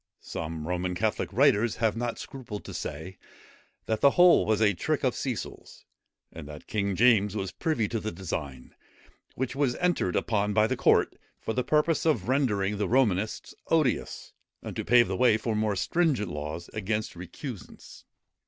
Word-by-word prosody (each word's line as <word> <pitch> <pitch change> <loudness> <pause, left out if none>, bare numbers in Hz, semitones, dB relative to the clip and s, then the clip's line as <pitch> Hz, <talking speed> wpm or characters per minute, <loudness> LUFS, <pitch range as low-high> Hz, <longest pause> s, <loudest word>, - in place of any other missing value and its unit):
Some 80 -1 -5
Roman 90 0 -2
Catholic 100 -2 -1
writers 120 -1 +3
have 110 -2 0
not 120 0 -3
scrupled 120 -6 -8
to - - -8
say, 80 +6 -6 0.7
that 110 -1 -1
the 140 - +7
whole 175 -1 +5
was 110 -1 +2
a 105 -2 +4
trick 85 - -2
of - - +2
Cecil's, - - -6 0.5
and 75 -3 -9
that 75 0 -10
King 100 -2 -1
James 110 -3 +4
was 95 -3 -3
privy 125 -10 -1
to 115 - -2
the 110 +1 -4
design, 75 -8 -6 0.6
which 130 +1 -3
was 135 -3 +1
entered 175 - 0
upon 105 -2 0
by 105 +1 +4
the - - 0
court, - - +3 0.2
for 110 - -3
the 125 - 0
purpose 150 +4 +2
of 125 - +1
rendering 105 -7 +1
the 105 - -1
Romanists 110 -5 +1
odious, 155 -7 0 0.3
and - - -6
to - - -3
pave 120 +1 +5
the - - -2
way 120 -3 +4
for 110 0 -2
more 105 -1 0
stringent 125 - 0
laws 75 +3 -5
against 110 0 -2
recusants. 95 - -9
110 Hz, 170 wpm, -27 LUFS, 95-125 Hz, 0.7 s, the